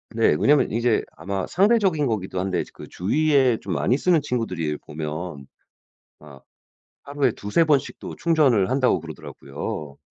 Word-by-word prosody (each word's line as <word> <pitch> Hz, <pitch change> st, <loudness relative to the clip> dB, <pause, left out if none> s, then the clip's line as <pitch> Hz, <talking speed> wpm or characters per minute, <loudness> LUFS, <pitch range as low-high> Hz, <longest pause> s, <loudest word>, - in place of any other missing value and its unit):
네. -, -, +3 dB
왜냐하면 145 Hz, 0 st, +3 dB
이제 115 Hz, 0 st, +1 dB
아마 95 Hz, -1 st, -3 dB
상대적인 195 Hz, -6 st, +2 dB
거기도 95 Hz, -5 st, -3 dB
한데 95 Hz, 0 st, -1 dB
이제 -, -, -9 dB
그 -, -, -11 dB
주위에 135 Hz, -, +2 dB
좀 -, -, -4 dB
많이 125 Hz, -, +1 dB
쓰는 170 Hz, +1 st, +2 dB
친구들 115 Hz, -, -3 dB
이래 75 Hz, -2 st, -1 dB
보면 75 Hz, -1 st, -6 dB, 0.7 s
막 70 Hz, -3 st, -15 dB, 0.6 s
'하루에 140 Hz, -3 st, 0 dB
2-3 105 Hz, +13 st, +1 dB
번씩도 145 Hz, -3 st, -1 dB
충전을 140 Hz, -, +2 dB
한다.'고 130 Hz, -7 st, +2 dB
그러더라고요. 75 Hz, -2 st, -7 dB
115 Hz, 325 characters per minute, -23 LUFS, 90-145 Hz, 0.7 s, 네